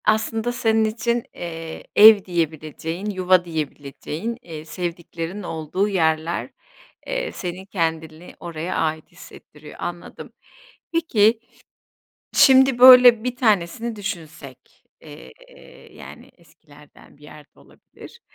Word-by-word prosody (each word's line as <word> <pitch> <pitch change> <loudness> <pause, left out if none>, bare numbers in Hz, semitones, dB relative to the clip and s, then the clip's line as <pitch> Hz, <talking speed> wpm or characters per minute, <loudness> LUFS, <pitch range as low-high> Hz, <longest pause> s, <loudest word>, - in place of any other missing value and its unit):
Aslında 225 +2 0
senin 225 -2 +1
için, 230 +2 -2
eee, 165 -2 -8
ev 210 -2 +8
diyebileceğin, 165 +2 -4
yuva 185 -2 +2
diyebileceğin, 155 +6 -6
iii, 160 -5 -10
sevdiklerin 170 +2 -6
olduğu 165 +4 -3
yerler, 160 -3 -1 0.6
eee, - - -3
seni 180 +1 -7
kendini 160 -3 -4
oraya 170 +1 -6
ait 155 -1 -3
hissettiriyor, - - -15
anladım. - - -8 0.6
Peki, 230 -9 +2 1.0
şimdi, 265 -2 +5
böyle, 250 -2 +8
bir 250 0 -3
tanesini 220 0 0
düşünsek, 170 -5 -9 0.2
eee, - - -14 0.6
yani, - - -13
eskilerden 150 -4 -21
bir - - -24
yer 150 0 -14
de - - -26
olabilir. - - -17
180 Hz, 105 wpm, -21 LUFS, 160-220 Hz, 1.0 s, ev